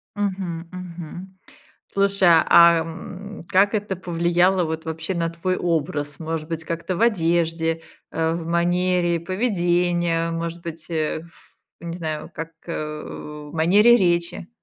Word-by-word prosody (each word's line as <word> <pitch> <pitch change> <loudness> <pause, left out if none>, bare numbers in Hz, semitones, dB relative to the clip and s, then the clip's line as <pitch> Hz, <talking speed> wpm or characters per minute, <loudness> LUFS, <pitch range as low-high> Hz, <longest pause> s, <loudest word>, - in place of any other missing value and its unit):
Мгм, 185 -4 -3
мгм. 180 +1 -8 0.5
Слушай, 200 -2 +3 0.2
а, 170 -1 +7
м, 185 +4 -8
как 200 +3 +4
это 205 -2 -1
повлияло 175 +1 +2
вот 160 0 -3
вообще 160 +3 -3
на 165 -1 0
твой 175 +2 -2
образ? 145 -3 -1
Может 160 -1 -4
быть 165 -1 -4
как-то 170 +3 -3
в - - -3
одежде, 165 -5 +1 0.3
э, 165 0 0
в 165 -1 -4
манере 175 0 +1
поведения, 175 -3 +1
может 170 +1 -4
быть, 165 -1 -8
ф 160 +1 -4 0.3
не 170 0 -5
знаю, 155 -2 -4
как, 165 +1 -5 0.2
э, 150 -2 -4 0.5
в - - -13
манере 205 +9 +6
речи? 170 -2 0
170 Hz, 130 wpm, -23 LUFS, 165-185 Hz, 0.5 s, а